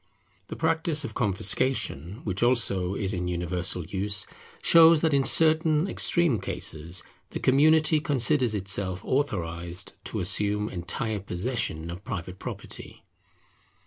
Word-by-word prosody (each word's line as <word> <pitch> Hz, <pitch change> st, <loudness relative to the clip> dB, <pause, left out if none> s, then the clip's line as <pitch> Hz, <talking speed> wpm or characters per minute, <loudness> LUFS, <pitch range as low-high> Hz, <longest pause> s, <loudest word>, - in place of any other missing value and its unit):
The -, -, -6 dB
practice 160 Hz, -1 st, 0 dB
of -, -, -6 dB
confiscation, 100 Hz, -, 0 dB
which 95 Hz, -2 st, -3 dB
also 100 Hz, -7 st, +2 dB
is 100 Hz, 0 st, -2 dB
in 90 Hz, -1 st, -2 dB
universal 90 Hz, 0 st, -1 dB
use, 100 Hz, +2 st, 0 dB, 0.4 s
shows 165 Hz, -1 st, +7 dB
that 160 Hz, -3 st, +2 dB
in 140 Hz, -1 st, +3 dB
certain 160 Hz, +2 st, +3 dB
extreme 170 Hz, -, +1 dB
cases 85 Hz, -2 st, -6 dB, 0.3 s
the -, -, -5 dB
community 155 Hz, +3 st, +4 dB
considers 130 Hz, -4 st, +1 dB
itself 95 Hz, -1 st, -2 dB
authorized 85 Hz, -, -3 dB
to -, -, -3 dB
assume 105 Hz, +3 st, +1 dB
entire 100 Hz, +5 st, -2 dB
possession 90 Hz, -4 st, -3 dB
of 90 Hz, +3 st, -9 dB
private 95 Hz, -3 st, -6 dB
property. -, -, -8 dB
105 Hz, 120 wpm, -26 LUFS, 90-145 Hz, 0.4 s, shows